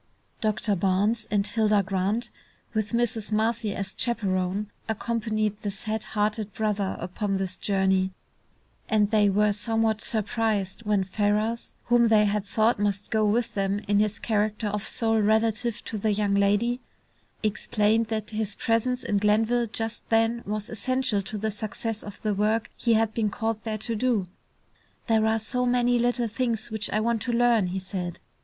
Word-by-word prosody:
Doctor 215 -1 +1
Barnes 200 +5 +1
and 200 -1 +1
Hilda 215 -2 +2
Grant, 200 +5 -1 0.4
with 215 -1 -1
Mrs. 235 -2 -1
Marcy 220 0 0
as 200 0 -4
chaperone, 195 -4 0 0.2
accompanied 215 -2 -1
the 205 - -2
sad 215 +2 -3
hearted 210 0 -1
brother 210 -3 -1
upon 195 +3 -2
this 190 -1 -2
journey, 190 -1 +1 0.8
and 210 -1 +3
they 210 -2 +4
were 210 +1 +3
somewhat 220 +1 0
surprised 215 -2 -1
when 205 -2 +3
Ferrars, 210 +4 -1
whom 240 -1 +4
they 215 -1 +5
had 205 0 -1
thought 220 +2 +2
must 205 -1 -1
go 220 -1 +2
with 225 +3 +1
them 195 0 0
in 205 0 +3
his 210 0 +1
character 215 -1 0
of 210 0 -2
sole 225 +1 +1
relative 220 +2 +1
to 215 - -4
the 215 +1 +1
young 205 -1 +1
lady, 205 +5 +2 0.6
explained 215 +1 +1
that 215 -1 -3
his 215 -2 -3
presence 245 +3 0
in 205 - +1
Glenville 225 +3 +2
just 225 +1 -4
then 225 +1 +2
was 210 0 -3
essential 235 -1 0
to 195 +2 -6
the 215 +1 -1
success 215 +1 -4
of 205 -1 -9
the 215 -1 +1
work 215 +3 0
he 235 -2 +2
had 220 0 +2
been 220 -2 +1
called 220 +1 -2
there 220 -1 -2
to 225 +2 -2
do. 225 -4 +1 0.8
"There 220 -2 +3
are 220 0 +2
so 250 +3 -1
many 245 0 +3
little 240 0 +1
things 230 -1 -2
which 220 -1 +1
I 215 - +1
want 225 0 0
to 245 - -1
learn," 235 -4 +3
he 180 +2 -3
said. 185 -2 -4
215 Hz, 165 wpm, -26 LUFS, 205-225 Hz, 0.8 s, they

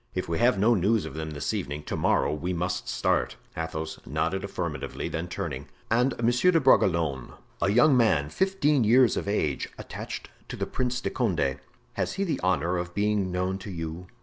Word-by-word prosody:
"If 90 0 -2
we 85 0 -1
have 120 -2 +4
no 110 +5 +4
news 105 0 +2
of 80 - -7
them 80 0 -4
this 75 -2 -3
evening, 75 +1 -3
to - - -4
morrow 75 - +2
we 85 +4 -2
must 90 +2 -2
start." - - 0 0.2
Athos 80 -1 -4
nodded - - -1
affirmatively, - - -4
then 85 +2 -3
turning: 70 -5 -5 0.2
"And 125 +3 +2
Monsieur 120 +9 +4
de 170 -2 +5
Bragelonne, 85 - +2 0.3
a - - +3
young 120 +7 +5
man 90 - +3
fifteen 150 -9 +2
years 120 +2 +5
of - - -3
age, 75 -9 -1
attached - - -7 0.2
to - - -4
the - - -2
Prince 125 0 -2
de - - -2
Condé—has 65 - -2
he 195 - -1
the 160 -8 -1
honor 90 -1 +1
of 85 0 -6
being 105 -2 +1
known 90 +1 -1
to 100 - -8
you?" 85 0 -6
95 Hz, 185 wpm, -27 LUFS, 80-120 Hz, 0.3 s, de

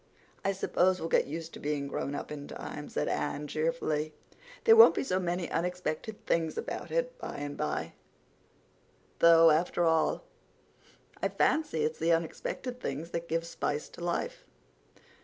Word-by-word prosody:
"I 195 - +2
suppose 185 -1 +2
we'll 165 - -3
get - - +3
used 165 +3 -6
to - - -8
being 145 -1 -2
grownup 140 +1 -4
in 145 -1 -6
time," 150 0 -7
said - - -1
Anne 145 +1 -2
cheerfully. 155 0 -1 0.5
"There 450 - +8
won't 455 - +9
be - - 0
so 185 -8 0
many 175 -1 -1
unexpected 180 +4 -3
things 165 -1 0
about - - -4
it - - -1
by - - -6
and 145 0 -5
by—though, 165 - 0
after 170 +2 +2
all, 160 - +2 1.0
I - - +1
fancy 300 - +1
it's 155 +1 -1
the 165 +1 +3
unexpected 205 +9 -3
things 165 - -4
that 170 0 -3
give 165 +1 -1
spice 150 -3 -3
to - - -10
life. 485 - -2
165 Hz, 150 wpm, -30 LUFS, 150-180 Hz, 1.0 s, won't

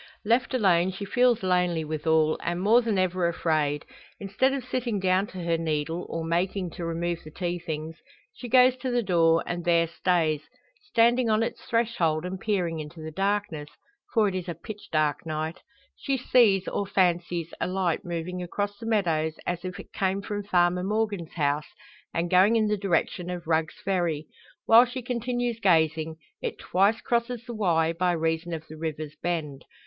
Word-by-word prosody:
Left 240 +4 +2
alone, 185 -6 +3
she 195 +2 -6
feels 245 0 +2
lonely 180 -3 +1
withal, 155 0 +2
and 175 +1 -2
more 220 +6 +5
than 225 -4 -1
ever 185 -1 +1
afraid. 155 -3 0 0.3
Instead 205 +7 +1
of 270 -2 -3
sitting 245 -4 -2
down 190 +1 +2
to 185 -3 -7
her 170 -1 0
needle, 160 +1 -2
or 165 -1 -3
making 180 +2 -1
to 175 - -7
remove 170 +1 -2
the 155 - -10
tea 175 +2 -3
things, 160 -1 -5 0.4
she 245 - -8
goes 255 +1 +6
to 255 0 -3
the 245 -1 +1
door, 165 -3 +3
and 175 0 -3
there 170 -1 +3
stays, 165 -2 0 0.4
standing 240 - +3
on 215 +1 +3
its - - -4
threshold 180 -9 0
and 185 +1 -4
peering 180 -7 -1
into 155 +2 -8
the 160 0 -6
darkness 195 -4 -1 0.4
for 220 -3 +3
it 195 - -1
is 185 -1 -4
a 170 - -3
pitch 210 +5 -10
dark 155 -2 +1
night 160 +2 -3 0.4
she 275 -1 -1
sees, 220 -7 +4
or 200 - -2
fancies, 175 -3 0
a - - +1
light 185 -3 0
moving 175 +1 -4
across 205 +3 -3
the 225 - -6
meadows, 165 -8 +1
as 175 0 -2
if 185 -1 -6
it - - -12
came 190 0 0
from 205 0 -3
Farmer 180 -2 +2
Morgan's 205 -3 -2
house, 150 -1 -1 0.4
and 170 +1 -1
going 190 +5 +5
in 220 -1 +3
the 210 - +1
direction 180 -2 -1
of 180 -1 -5
Rugg's 160 -2 0
Ferry. 175 -5 0 0.4
While 230 +2 +8
she 250 +1 -6
continues 245 -1 -2
gazing, 160 -5 +2 0.3
it - - -3
twice 200 +4 +2
crosses 235 0 -1
the 240 - -6
Wye, 165 -6 +1
by 180 +1 +1
reason 165 +1 -1
of 160 -1 -5
the 155 - -10
river's 155 -1 -5
bend. 155 -5 -3
180 Hz, 180 wpm, -26 LUFS, 165-210 Hz, 0.4 s, While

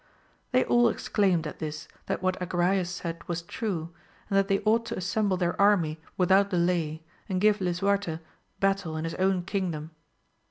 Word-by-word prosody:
They 255 0 +4
all 240 -1 +4
exclaimed 190 -9 +1
at 150 - -6
this 150 -1 -5 0.2
that - - -2
what 185 0 0
Agrayes 180 +1 +1
said 170 -2 -5
was 170 -1 -3
true, 170 -4 -4 0.4
and - - +1
that 195 - +1
they 195 -1 +1
ought 220 +2 +3
to - - -4
assemble 190 +1 0
their 175 -1 0
army 170 -7 +3 0.2
without 190 +2 +4
delay 170 -4 0 0.3
and 185 -1 0
give 210 +1 +3
Lisuarte 185 -1 0 0.4
battle 195 -5 0
in 155 - -3
his 165 0 -3
own 190 -1 +2
kingdom. 175 -5 -3
185 Hz, 165 wpm, -27 LUFS, 170-200 Hz, 0.4 s, They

